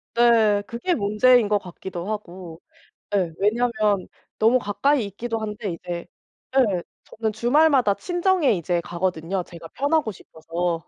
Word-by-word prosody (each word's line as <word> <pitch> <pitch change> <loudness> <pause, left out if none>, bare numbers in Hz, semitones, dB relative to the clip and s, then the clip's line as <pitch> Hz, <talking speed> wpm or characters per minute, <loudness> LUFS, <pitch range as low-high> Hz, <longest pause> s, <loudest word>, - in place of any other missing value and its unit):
네. 225 -3 +4
그게 340 +10 -1
문제인 215 +3 +4
것 205 0 +2
같기도 180 0 -7
하고. 180 -5 -7 0.5
예. 180 -5 0
왜냐하면 215 -2 +1 0.3
너무 230 +4 +4
가까이 240 +4 +1
있기도 225 +3 -4
한데 210 -3 -4
이제 170 +1 -6 0.5
예 200 -9 +2 0.2
저는 220 -1 -3
주말마다 255 0 +3
친정에 355 - +1
이제 175 -1 -1
가거든요, 175 +1 -2
제가 170 -1 -11
편하고 285 - 0
싶어서. 165 -1 -4
210 Hz, 290 characters per minute, -23 LUFS, 180-240 Hz, 0.5 s, 네